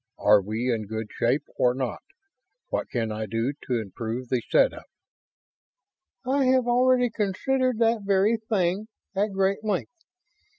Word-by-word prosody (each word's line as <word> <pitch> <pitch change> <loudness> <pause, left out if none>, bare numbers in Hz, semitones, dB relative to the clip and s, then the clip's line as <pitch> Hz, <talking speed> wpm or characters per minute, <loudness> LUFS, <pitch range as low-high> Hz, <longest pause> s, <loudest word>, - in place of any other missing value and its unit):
Are 105 -1 +5
we 110 +5 -1
in 110 -2 -3
good 110 0 -5
shape 125 +5 +1
or 125 0 +3
not? 130 -2 -3 0.7
What - - -2
can 115 -3 -2
I 110 0 -4
do 115 +6 -1
to 125 -2 +1
improve 115 +4 -5
the 125 -2 +1
setup?" - - +2 1.4
"I 270 +1 +2
have 255 -1 +3
already 250 0 +3
considered 250 +5 0
that 230 -1 +2
very 200 +3 +2
thing 210 -2 -1 0.3
at 205 +2 +1
great 195 +2 0
length. 210 - -2
190 Hz, 140 wpm, -26 LUFS, -, 1.4 s, Are